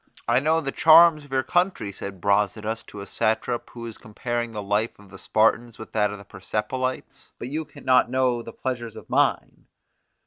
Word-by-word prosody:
I 120 Hz, +2 st, +4 dB
know 160 Hz, +4 st, +2 dB
the 135 Hz, -3 st, -3 dB
charms 160 Hz, 0 st, +6 dB
of 145 Hz, -, -17 dB
your 130 Hz, -1 st, +1 dB
country, 175 Hz, -, 0 dB
said 95 Hz, -1 st, -8 dB
Brasidas 105 Hz, +2 st, 0 dB
to 100 Hz, -, -9 dB
a -, -, -7 dB
satrap 110 Hz, +4 st, -1 dB
who 120 Hz, -, -11 dB
was 115 Hz, -2 st, -7 dB
comparing 120 Hz, +2 st, -4 dB
the 105 Hz, -2 st, -5 dB
life 105 Hz, +3 st, 0 dB
of 100 Hz, -2 st, -18 dB
the 95 Hz, -, -11 dB
Spartans 115 Hz, +1 st, +1 dB
with 110 Hz, -, -10 dB
that 105 Hz, -1 st, +2 dB
of 105 Hz, -, -6 dB
the 100 Hz, -, -13 dB
Persepolites; 105 Hz, +7 st, -4 dB
but 120 Hz, -, -6 dB
you 155 Hz, +3 st, -3 dB
can 140 Hz, -2 st, -15 dB
not 130 Hz, -2 st, +4 dB
know 130 Hz, -2 st, +1 dB
the 115 Hz, -, -9 dB
pleasures 120 Hz, -2 st, -5 dB
of -, -, -11 dB
mine. -, -, 0 dB
115 Hz, 200 wpm, -24 LUFS, 105-130 Hz, -, charms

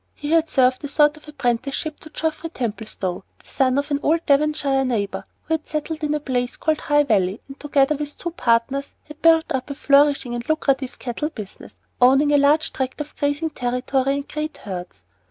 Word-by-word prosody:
He 295 Hz, +1 st, -5 dB
had 330 Hz, -1 st, +3 dB
served 255 Hz, +1 st, +3 dB
a -, -, -2 dB
sort 295 Hz, +1 st, +3 dB
of 305 Hz, -, -17 dB
apprenticeship 275 Hz, +2 st, -2 dB
to 310 Hz, -, -11 dB
Geoffrey 320 Hz, +1 st, -3 dB
Templestowe, 215 Hz, -, -4 dB
the -, -, -25 dB
son 265 Hz, -1 st, +1 dB
of 285 Hz, +1 st, -1 dB
an 285 Hz, -, +1 dB
old 325 Hz, +2 st, +1 dB
Devonshire 285 Hz, -2 st, +2 dB
neighbor, 220 Hz, -6 st, -2 dB, 0.2 s
who 320 Hz, -, -2 dB
had 315 Hz, -1 st, -2 dB
settled 310 Hz, +1 st, -4 dB
in 300 Hz, 0 st, +1 dB
a -, -, -1 dB
place 250 Hz, -3 st, -2 dB
called 315 Hz, -1 st, 0 dB
High 295 Hz, 0 st, +3 dB
Valley, 200 Hz, -5 st, +1 dB
and, 275 Hz, 0 st, -11 dB
together 290 Hz, 0 st, +2 dB
with 295 Hz, 0 st, -5 dB
two 345 Hz, -, -4 dB
partners, 255 Hz, -1 st, 0 dB
had 300 Hz, 0 st, -12 dB
built 325 Hz, -1 st, +5 dB
up 260 Hz, +2 st, -2 dB
a 280 Hz, -, -4 dB
flourishing 280 Hz, -3 st, +3 dB
and 240 Hz, +2 st, -5 dB
lucrative 275 Hz, -4 st, 0 dB
cattle 265 Hz, +5 st, -3 dB
business, 215 Hz, -11 st, -10 dB, 0.3 s
owning 270 Hz, +4 st, +5 dB
a 290 Hz, -, +5 dB
large 295 Hz, +3 st, +3 dB
tract 260 Hz, +1 st, -3 dB
of 300 Hz, 0 st, -6 dB
grazing 290 Hz, +2 st, -1 dB
territory 255 Hz, +2 st, 0 dB
and 280 Hz, 0 st, -4 dB
great 305 Hz, 0 st, -4 dB
herds. 180 Hz, -, -8 dB
280 Hz, 195 wpm, -22 LUFS, 250-305 Hz, 0.3 s, built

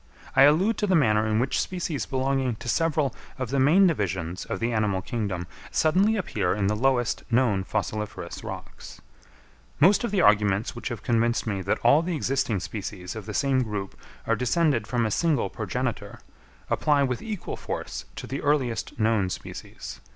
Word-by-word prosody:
I 135 Hz, +1 st, +8 dB
allude 190 Hz, +9 st, +2 dB
to 210 Hz, -, +1 dB
the 185 Hz, -, +3 dB
manner 110 Hz, -7 st, +3 dB
in 110 Hz, 0 st, +1 dB
which 130 Hz, +4 st, +1 dB
species 170 Hz, -5 st, -3 dB
belonging 130 Hz, -2 st, 0 dB
to 115 Hz, -, -10 dB
several 155 Hz, 0 st, +1 dB, 0.2 s
of 130 Hz, -2 st, -4 dB
the 140 Hz, -, +1 dB
main 160 Hz, +9 st, +6 dB
divisions 95 Hz, -, -1 dB
of 95 Hz, -, -4 dB
the 115 Hz, +1 st, 0 dB
animal 105 Hz, -4 st, 0 dB
kingdom 100 Hz, -7 st, -3 dB, 0.2 s
suddenly 190 Hz, +8 st, +3 dB
appear 105 Hz, -, -1 dB
in 100 Hz, -1 st, 0 dB
the 105 Hz, +2 st, +1 dB
lowest 120 Hz, 0 st, +1 dB
known 115 Hz, -6 st, +2 dB
fossiliferous 105 Hz, +1 st, -4 dB
rocks. -, -, -9 dB, 0.8 s
Most 195 Hz, -, +5 dB
of 235 Hz, -, 0 dB
the 200 Hz, -1 st, 0 dB
arguments 105 Hz, -, +3 dB
which 120 Hz, -, -5 dB
have 115 Hz, -3 st, -6 dB
convinced 115 Hz, 0 st, +1 dB
me 100 Hz, -4 st, -2 dB
that 95 Hz, -, 0 dB
all 140 Hz, +6 st, +6 dB
the 170 Hz, 0 st, -2 dB
existing 135 Hz, -7 st, 0 dB
species 95 Hz, -3 st, -6 dB
of 110 Hz, -2 st, -7 dB
the 105 Hz, -, -5 dB
same 135 Hz, -2 st, +2 dB
group 105 Hz, -5 st, -4 dB, 0.3 s
are 115 Hz, -, +2 dB
descended 125 Hz, -1 st, +1 dB
from 120 Hz, -2 st, 0 dB
a 110 Hz, -, -1 dB
single 155 Hz, +1 st, +1 dB
progenitor, -, -, -3 dB, 0.5 s
apply 145 Hz, -2 st, +2 dB
with 125 Hz, -3 st, -1 dB
equal 215 Hz, -5 st, -5 dB
force -, -, -5 dB
to -, -, -6 dB
the 135 Hz, -, -4 dB
earliest 135 Hz, -7 st, 0 dB
known 110 Hz, -4 st, +2 dB
species. -, -, -8 dB
120 Hz, 175 wpm, -26 LUFS, 105-145 Hz, 0.8 s, I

